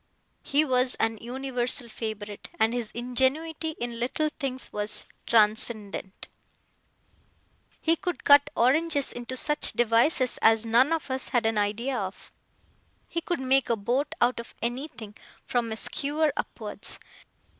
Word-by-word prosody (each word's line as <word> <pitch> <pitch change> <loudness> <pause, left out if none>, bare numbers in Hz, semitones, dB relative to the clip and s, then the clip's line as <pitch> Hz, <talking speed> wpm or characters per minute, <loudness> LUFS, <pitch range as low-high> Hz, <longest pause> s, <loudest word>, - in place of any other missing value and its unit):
He 295 +2 +1
was 255 -2 +2
an 225 -1 -1
universal 250 0 -2
favourite, 215 -2 -7
and 220 +1 +3
his 240 -3 -2
ingenuity 275 +7 -1
in 235 -1 -4
little 280 +6 -1
things 260 -3 -3
was 210 0 0 0.2
transcendent. 210 -3 +4 1.5
He 330 +1 +2
could 355 0 -4
cut 285 0 +6
oranges 285 +3 +2
into 245 +1 -6
such 295 +3 +2
devices 240 +4 +2
as 225 0 +4
none 240 +6 +3
of 320 -4 -2
us 260 0 -3
had 240 -3 +1
an 225 -1 +1
idea 225 +6 -1
of. 195 -4 -6 0.8
He 335 - -3
could 345 -3 -3
make 265 0 +2
a 235 - +3
boat 245 +7 -2
out 240 0 +2
of 235 - -10
anything, 240 -3 -5 0.3
from 235 -2 -1
a 220 - -4
skewer 295 +4 0
upwards. - - -5
245 Hz, 135 wpm, -26 LUFS, 225-280 Hz, 1.5 s, cut